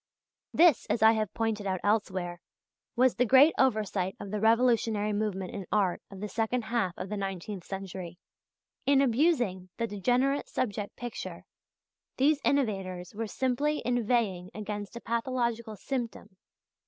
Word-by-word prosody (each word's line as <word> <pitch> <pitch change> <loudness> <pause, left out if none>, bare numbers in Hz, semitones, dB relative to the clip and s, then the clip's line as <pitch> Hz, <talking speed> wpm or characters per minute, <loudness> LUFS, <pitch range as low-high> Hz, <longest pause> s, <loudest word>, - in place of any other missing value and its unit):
This, 330 -6 +5
as 220 - +1
I 220 - +8
have 215 -3 -1
pointed 220 -3 -1
out 185 -1 -1
elsewhere, 185 -4 0 0.5
was 255 0 +4
the 250 - +4
great 270 +6 +6
oversight 210 -7 +1
of 200 -1 -7
the 210 - -1
revolutionary 225 -2 +3
movement 205 -3 -2
in 195 -3 -6
Art 195 -4 +1
of 195 -1 -10
the 210 - -2
second 225 +3 -1
half 215 -6 -1
of 190 - -5
the 210 - -3
nineteenth 195 0 -4
century. 190 -2 -6 0.7
In 280 -1 +5
abusing 245 - +2
the 230 - 0
degenerate 245 +7 0
"subject" 205 -4 -3
picture, 240 -1 -6 0.7
these 285 +2 +3
innovators 195 -9 -1
were 225 +2 -3
simply 265 +6 0
inveighing 230 -7 0
against 205 0 -5
a 235 - -6
pathological 235 -2 -1
symptom. 235 -5 -5
220 Hz, 140 wpm, -29 LUFS, 195-245 Hz, 0.7 s, I